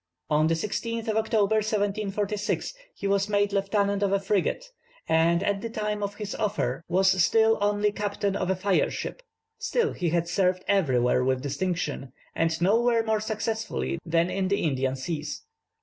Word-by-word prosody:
On 155 +1 +4
the 165 - +2
16th 230 +5 -3
of 215 - 0
October, 220 -1 +2
1746, 210 - -1 0.2
he - - -7
was 200 +1 +1
made 205 -1 +1
lieutenant 200 0 +1
of 200 -1 +1
a 200 - +3
frigate, 200 - 0 0.4
and 165 +2 +3
at 200 -1 0
the 230 - -4
time 210 -2 -3
of 205 0 -3
his 210 -1 -5
offer 170 - -1
was 190 +1 +3
still 225 +3 +4
only 205 0 +2
captain 205 -1 -2
of 185 - -1
a 190 - +2
fire 190 +1 +1
ship. - - -5 0.4
Still 470 -2 0
he 175 -2 -1
had 170 +1 0
served 185 0 +1
everywhere 125 -10 +2
with 130 0 0
distinction, 145 -3 -3 0.2
and 165 -1 0
nowhere 230 +5 +3
more 220 -1 +1
successfully 215 - -2
than 165 +2 +1
in 190 -1 0
the 200 +1 0
Indian 135 -3 0
Seas. 150 - -4
200 Hz, 165 wpm, -26 LUFS, 170-210 Hz, 0.4 s, On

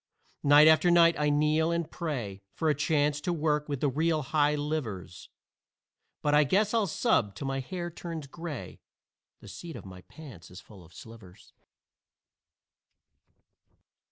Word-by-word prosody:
Night 145 +2 +6
after 160 +3 +5
night 170 -1 +6
I 150 0 +2
kneel 155 +2 +2
and 170 -1 -2
pray 120 - -5
For 160 -2 +1
a - - +2
chance 145 +1 0
to 175 - -2
work 150 -2 -1
with 140 -3 -3
the 145 - +2
real 155 +3 0
high 150 +2 +1
livers, 120 - -5 0.9
But 145 - +1
I 150 +1 +6
guess 200 - +1
I'll 225 -3 +2
sub 155 - 0
till 135 - -6
my 135 0 -2
hair 175 +6 -5
turns 165 -2 -7
gray 155 -1 -8 0.6
The - - -13
seat 170 -2 -9
of - - -10
my 95 -1 -11
pants 125 - -13
is 90 - -11
full 100 -5 -15
of 80 - -19
slivers. 110 -5 -14
150 Hz, 155 wpm, -28 LUFS, 130-165 Hz, 0.9 s, Night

